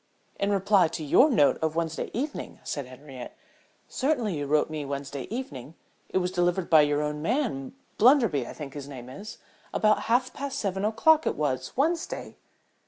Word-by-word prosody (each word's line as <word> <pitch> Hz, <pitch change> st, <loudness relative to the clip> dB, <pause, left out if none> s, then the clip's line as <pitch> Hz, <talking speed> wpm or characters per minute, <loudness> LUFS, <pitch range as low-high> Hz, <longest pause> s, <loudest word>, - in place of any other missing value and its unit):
"In 200 Hz, -, +1 dB
reply 195 Hz, -2 st, +4 dB
to 160 Hz, 0 st, -5 dB
your 255 Hz, -, +5 dB
note 150 Hz, -, +3 dB
of 160 Hz, 0 st, 0 dB
Wednesday 165 Hz, -1 st, -2 dB
evening," 285 Hz, +6 st, -4 dB
said 140 Hz, -3 st, -4 dB
Henriette. 130 Hz, -1 st, -10 dB, 0.5 s
"Certainly 255 Hz, -, 0 dB
you 145 Hz, -1 st, -3 dB
wrote 150 Hz, +1 st, +3 dB
to -, -, -15 dB
me 155 Hz, -1 st, -3 dB
Wednesday 140 Hz, -1 st, -5 dB
evening? 160 Hz, -, -6 dB, 0.3 s
It -, -, 0 dB
was 180 Hz, -1 st, 0 dB
delivered 175 Hz, 0 st, 0 dB
by 160 Hz, -2 st, +8 dB
your 145 Hz, 0 st, +1 dB
own 150 Hz, 0 st, -3 dB
man, 225 Hz, -, -1 dB, 0.2 s
Blunderby 225 Hz, -, +4 dB
I -, -, -7 dB
think 145 Hz, -3 st, -8 dB
his 145 Hz, -1 st, -7 dB
name 125 Hz, -3 st, -9 dB
is? 205 Hz, +11 st, -9 dB, 0.3 s
About 215 Hz, 0 st, +3 dB
half 250 Hz, +2 st, +2 dB
past 280 Hz, -1 st, -4 dB
seven 195 Hz, -1 st, -1 dB
o'clock 305 Hz, +9 st, +4 dB
it -, -, 0 dB
was 130 Hz, -4 st, -2 dB
Wednesday." 330 Hz, +5 st, -1 dB
170 Hz, 175 wpm, -27 LUFS, 145-230 Hz, 0.5 s, by